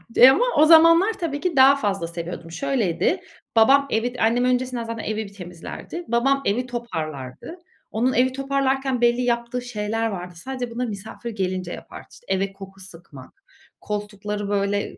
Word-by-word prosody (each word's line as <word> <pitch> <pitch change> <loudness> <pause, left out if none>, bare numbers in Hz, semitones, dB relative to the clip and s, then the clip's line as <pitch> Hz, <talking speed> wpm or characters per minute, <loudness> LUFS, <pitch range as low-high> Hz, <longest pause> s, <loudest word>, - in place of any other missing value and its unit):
eee, 255 - +9
ama 470 - +3
o 305 - +7
zamanlar 330 +6 +7
tabii 305 -5 -2
ki 355 -1 -2
daha 270 +1 +7
fazla 195 -10 -2
seviyordum. 170 0 -7
Şöyleydi: 270 - 0 0.3
Babam 275 +5 +5
evi 235 +3 0
annem 235 +3 +2
öncesinden 250 -1 0
zaten 230 -1 -5
evi 215 0 -3
bir 200 - -13
temizlerdi. 180 - -8
Babam 270 +4 +2
evi 240 +6 0
toparlardı. 160 - -6 0.3
Onun 245 +4 +1
evi 255 +1 +2
toparlarken 270 -1 0
belli 240 +1 +3
yaptığı 235 0 -1
şeyler 225 -1 -2
vardı. 180 -4 -6
Sadece 250 +5 -5
bunları 245 +1 -3
misafir 220 +3 -7
gelince 185 -4 -3
yapardı. - - -10
İşte, - - -17
eve 195 +1 0
koku 195 0 -12
sıkmak, 165 -8 -14 0.4
koltukları 205 0 -4
böyle 200 0 -1
230 Hz, 155 wpm, -23 LUFS, 195-265 Hz, 0.4 s, eee